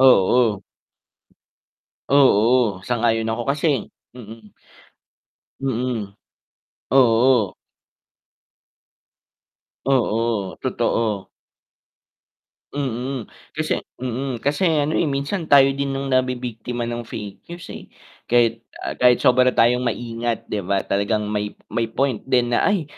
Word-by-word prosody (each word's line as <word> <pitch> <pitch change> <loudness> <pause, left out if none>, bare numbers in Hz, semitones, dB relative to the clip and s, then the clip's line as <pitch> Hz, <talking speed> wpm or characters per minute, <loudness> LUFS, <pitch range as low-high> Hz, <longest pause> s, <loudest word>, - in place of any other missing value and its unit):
Oo. 115 -4 +4 1.5
Oo, 120 -5 +4
sang-ayon 115 -2 +1
ako 115 +1 -2
kasi 145 -4 -1 0.2
mm. 110 -2 -12 1.1
Mm. 120 -6 -2 0.8
Oo. 120 -5 +4 2.3
Oo, 115 -6 0
totoo. 105 -4 -1 1.5
Mm. 130 -2 -3 0.3
Kasi - - -1
mm, 125 0 -5
kasi 150 +6 +1
ano, 150 -2 +1
eh, 165 - +1
minsan 140 +5 -2
tayo 135 -2 +6
din 140 0 -2
nung 135 0 -3
nabibiktima 125 -2 -1
ng 120 -1 -4
fake 105 -3 -7
news, 175 0 -9
eh, - - -10 0.4
kahit, 115 -1 +3 0.2
ah, - - -3
kahit 125 -1 +3
sobra 125 0 +5
tayong 125 +2 +3
maingat 115 0 -3
'di 105 - -1
ba, 100 0 +1
talagang 105 +1 -1
may, 105 0 -3 0.2
may 115 +1 0
point 125 0 -1
din 125 -2 +2
na, 120 - +2
"Ay!" 200 -5 +1
120 Hz, 105 wpm, -21 LUFS, 110-135 Hz, 2.3 s, tayo